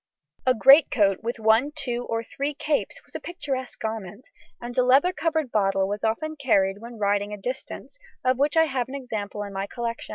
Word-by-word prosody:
A 255 Hz, -, +5 dB
greatcoat 225 Hz, -, +5 dB
with 235 Hz, +2 st, -3 dB
one, 225 Hz, +7 st, +3 dB
two, 245 Hz, -2 st, -3 dB
or 230 Hz, 0 st, -1 dB
three 280 Hz, +5 st, -4 dB
capes 295 Hz, +1 st, -2 dB
was -, -, -21 dB
a -, -, -4 dB
picturesque 270 Hz, -8 st, -5 dB
garment, 220 Hz, 0 st, -6 dB, 0.3 s
and 240 Hz, 0 st, -7 dB
a -, -, +4 dB
leather 270 Hz, +8 st, +4 dB
covered 315 Hz, -6 st, -1 dB
bottle 195 Hz, -2 st, +2 dB
was 205 Hz, +1 st, -4 dB
often 310 Hz, +8 st, -1 dB
carried 200 Hz, -8 st, +2 dB
when 235 Hz, +1 st, -10 dB
riding 205 Hz, 0 st, 0 dB
a -, -, -5 dB
distance, 255 Hz, -, -7 dB, 0.3 s
of 255 Hz, 0 st, +2 dB
which 290 Hz, +3 st, +2 dB
I 320 Hz, -, +7 dB
have 260 Hz, -5 st, -2 dB
an 275 Hz, -, -6 dB
example 215 Hz, -6 st, -4 dB
in 200 Hz, -1 st, -8 dB
my 195 Hz, +1 st, -3 dB
collection. 235 Hz, 0 st, -5 dB
240 Hz, 195 wpm, -25 LUFS, 210-275 Hz, 0.3 s, I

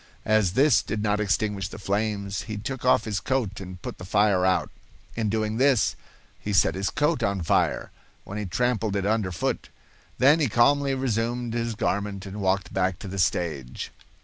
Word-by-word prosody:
As 110 Hz, -4 st, +3 dB
this 135 Hz, +3 st, +5 dB
did 105 Hz, -1 st, -3 dB
not 105 Hz, -1 st, +1 dB
extinguish 105 Hz, -2 st, 0 dB
the -, -, -9 dB
flames, 100 Hz, -2 st, -2 dB
he 105 Hz, -, -3 dB
took 125 Hz, +5 st, -5 dB
off 125 Hz, -3 st, +4 dB
his 105 Hz, -2 st, -1 dB
coat 120 Hz, -7 st, -1 dB
and 90 Hz, -1 st, -8 dB
put -, -, -6 dB
the -, -, -8 dB
fire 100 Hz, 0 st, +2 dB
out. 95 Hz, 0 st, +1 dB, 0.4 s
In 110 Hz, -2 st, 0 dB
doing 110 Hz, +1 st, -1 dB
this, 130 Hz, -3 st, +3 dB, 0.4 s
he 105 Hz, -, -4 dB
set 95 Hz, -, +4 dB
his 95 Hz, +1 st, -1 dB
coat 150 Hz, -2 st, +1 dB
on 100 Hz, -4 st, 0 dB
fire, -, -, +1 dB, 0.3 s
when 105 Hz, +2 st, -6 dB
he 105 Hz, -, -3 dB
trampled 115 Hz, -1 st, 0 dB
it 100 Hz, -1 st, 0 dB
under 105 Hz, -3 st, +1 dB
foot. 85 Hz, -, -2 dB, 0.5 s
Then 145 Hz, +5 st, +5 dB
he 145 Hz, -5 st, +2 dB
calmly 135 Hz, +4 st, +3 dB
resumed 120 Hz, -1 st, -1 dB
his 115 Hz, -1 st, -2 dB
garment 100 Hz, -1 st, -2 dB
and 100 Hz, +2 st, -6 dB
walked 95 Hz, -1 st, 0 dB
back 95 Hz, -1 st, 0 dB
to 100 Hz, -, -8 dB
the 95 Hz, +1 st, -5 dB
stage. 80 Hz, -8 st, -1 dB
105 Hz, 185 wpm, -25 LUFS, 95-120 Hz, 0.5 s, this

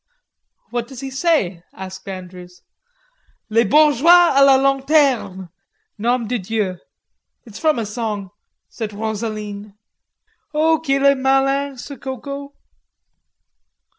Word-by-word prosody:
"What 240 Hz, -1 st, -3 dB
does 265 Hz, -2 st, -10 dB
he 270 Hz, -1 st, -6 dB
say?" 265 Hz, -, 0 dB
asked 190 Hz, 0 st, -9 dB
Andrews. 180 Hz, -1 st, -9 dB, 0.9 s
"'Les 230 Hz, +2 st, +3 dB
bourgeois 310 Hz, -, +5 dB
a 275 Hz, -, +5 dB
la 275 Hz, -1 st, +7 dB
lanterne, 270 Hz, -, +1 dB, 0.5 s
nom 235 Hz, +1 st, 0 dB
de 245 Hz, +1 st, -1 dB
dieu!' 190 Hz, -2 st, -2 dB, 0.7 s
It's 220 Hz, -2 st, -11 dB
from 310 Hz, -3 st, +2 dB
a 230 Hz, -, -2 dB
song," 210 Hz, -3 st, -4 dB, 0.4 s
said 220 Hz, -3 st, -6 dB
Rosaline. 210 Hz, -1 st, -5 dB, 0.8 s
"Oh, 320 Hz, +1 st, +3 dB
qu'il 275 Hz, -3 st, 0 dB
est 280 Hz, 0 st, +6 dB
malin, 270 Hz, +1 st, +1 dB
ce 280 Hz, +3 st, -8 dB
Coco!" 280 Hz, +2 st, -7 dB
245 Hz, 110 wpm, -20 LUFS, 205-275 Hz, 0.9 s, la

